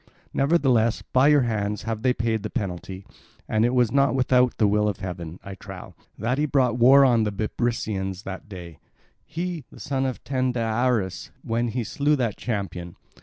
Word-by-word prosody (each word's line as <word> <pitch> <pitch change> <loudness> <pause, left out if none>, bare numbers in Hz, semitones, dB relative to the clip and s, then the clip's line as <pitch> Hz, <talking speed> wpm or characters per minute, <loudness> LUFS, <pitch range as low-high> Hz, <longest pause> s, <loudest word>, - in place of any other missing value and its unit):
Nevertheless, 135 -6 +2
by 130 +2 +3
your 150 -1 +5
hands 105 -3 -2
have 110 -1 -3
they 130 +1 +3
paid 115 -3 -1
the 110 - -4
penalty; 95 -3 -5 0.4
and 110 0 +1
it 120 +2 +2
was 120 -3 +3
not 140 -2 +3
without 125 -1 +3
the 110 - +3
will 105 +1 +2
of 100 - -3
heaven, 90 -2 -6
I 100 - -7
trow, 95 - -10 0.2
that 120 +5 -1
he 150 - +1
brought 125 -4 +1
war 135 +3 +7
on 120 -3 +4
the 105 - -1
Bebrycians 100 -3 -2
this 95 -1 -6
day—he, 135 - -8
the - - -14
son 135 -2 -1
of 130 - -5
Tyndareus, 120 -6 -1
when 115 +1 -1
he 120 +1 -2
slew 145 +7 +1
that 120 -7 -1
champion. 90 -6 -4
115 Hz, 170 wpm, -24 LUFS, 100-130 Hz, 0.4 s, war